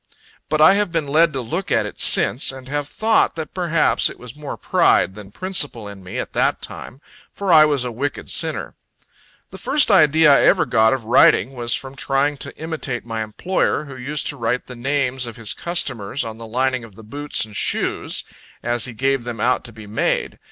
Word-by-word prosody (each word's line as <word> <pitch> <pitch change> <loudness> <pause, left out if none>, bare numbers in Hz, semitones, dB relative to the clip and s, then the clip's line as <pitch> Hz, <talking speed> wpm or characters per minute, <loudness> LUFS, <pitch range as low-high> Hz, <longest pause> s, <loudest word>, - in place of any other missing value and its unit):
But 155 0 +1
I 160 +5 +8
have 205 -2 0
been 165 -3 -1
led 160 +3 +3
to 135 - -3
look 165 +11 -4
at - - +2
it - - -9
since, 135 - +4
and 130 -1 -11
have 145 +1 -3
thought 220 +7 +1
that 160 -3 -6
perhaps 170 -4 +1
it - - -11
was 125 +1 -11
more 150 -1 -7
pride - - +2
than 105 -1 -11
principle 145 - -2
in 100 -2 -11
me, 90 - -7
at - - -5
that - - +1
time, 130 - -8 0.3
for 195 -3 -1
I 155 -1 +8
was 145 -4 0
a 125 - -3
wicked 140 +5 -4
sinner. - - 0 0.8
The - - -10
first 285 -3 +2
idea 155 -4 +5
I - - +4
ever - - +4
got 110 -1 +3
of 130 -4 -4
writing, 125 +3 +4
was 120 -2 0
from 135 0 -7
trying 140 +2 0
to 140 +1 -5
imitate 155 -7 -4
my 115 -1 -4
employer, 150 - -1
who 140 -2 -10
used 140 +4 -3
to 145 - -3
write 120 +1 -2
the 125 - -10
names 130 0 -1
of 115 - -8
his 115 -4 -2
customers 130 - -2
on 110 0 -8
the 115 - -8
lining 130 +2 -1
of 110 -4 -14
the 110 - -13
boots 145 +3 -2
and 105 -1 -14
shoes, - - 0 0.4
as 120 0 0
he 125 - -7
gave 135 +1 0
them 120 -2 -6
out 125 +3 +1
to 120 - -8
be 110 -1 -12
made. 105 +2 -2
135 Hz, 210 wpm, -20 LUFS, 115-150 Hz, 0.8 s, I